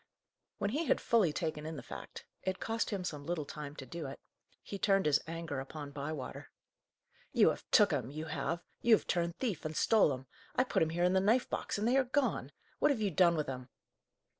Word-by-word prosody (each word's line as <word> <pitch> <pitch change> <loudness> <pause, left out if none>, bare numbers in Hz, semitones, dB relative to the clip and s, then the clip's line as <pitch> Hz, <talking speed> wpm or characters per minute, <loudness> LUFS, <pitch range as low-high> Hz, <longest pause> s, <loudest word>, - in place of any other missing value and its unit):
When 200 - -1
he 305 +7 0
had - - +3
fully 215 -9 +3
taken 155 -2 -3
in 160 - -5
the - - -7
fact - - -9 0.2
it 190 0 -2
cost 225 0 -1
him 200 -4 -2
some 150 -5 -4
little 160 -1 -2
time 145 0 -7
to 135 - -8
do 165 0 -5
it 135 - -8 0.4
he 200 - -6
turned 195 -1 +3
his 150 -1 +4
anger 165 -4 -4
upon 145 +2 -7
Bywater. 145 -1 -5 0.8
"You - - +6
have - - -8
took - - +6
'em, - - -1
you 155 +3 -5
have! 170 +2 -2 0.2
you 235 -2 +7
have - - -4
turned 170 -1 0
thief, 215 - -2
and 155 0 -4
stole 215 -9 +5
'em! 130 0 -5 0.3
I 255 - +4
put 260 - 0
'em 160 - +3
here 170 +2 0
in 180 +1 +4
the 190 - +5
knife 220 +6 +3
box, - - -2
and 210 +2 0
they 255 +3 +4
are 270 - +5
gone! 260 +2 0 0.3
What 295 - +4
have 275 -6 +1
you 205 -3 +1
done 170 0 +5
with 150 -2 -1
'em?" 130 -1 -5
170 Hz, 225 wpm, -33 LUFS, 150-205 Hz, 0.8 s, you